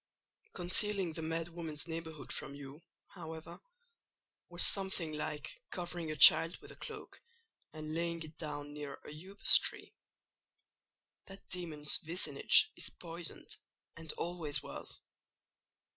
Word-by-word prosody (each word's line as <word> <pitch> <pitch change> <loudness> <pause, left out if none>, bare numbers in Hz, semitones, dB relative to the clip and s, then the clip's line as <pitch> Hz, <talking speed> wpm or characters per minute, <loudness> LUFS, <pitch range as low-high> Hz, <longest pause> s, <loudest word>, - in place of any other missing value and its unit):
"Concealing 185 0 +2
the 160 - -4
mad 165 +1 -2
woman's 165 -2 -5
neighbourhood 160 -2 -5
from 140 - -2
you, 140 +2 -10 0.3
however, 160 -1 -9 0.9
was 175 0 +2
something 190 -5 +1
like 150 - -4
covering 175 -2 -4
a 155 - -2
child 160 +4 +8
with - - -12
a - - -11
cloak 435 -3 -9 0.5
and 155 0 -6
laying 170 0 -1
it 155 0 -11
down 145 -2 -5
near 145 -1 -6
a - - -8
upas 195 +2 +6
tree: - - -4 1.3
that 195 0 -12
demon's 160 -5 +3
vicinage 160 -4 +4
is - - -1
poisoned, 170 0 -6 0.4
and 165 -2 -4
always 160 -5 -3
was. - - -8
165 Hz, 125 wpm, -35 LUFS, 155-175 Hz, 1.3 s, child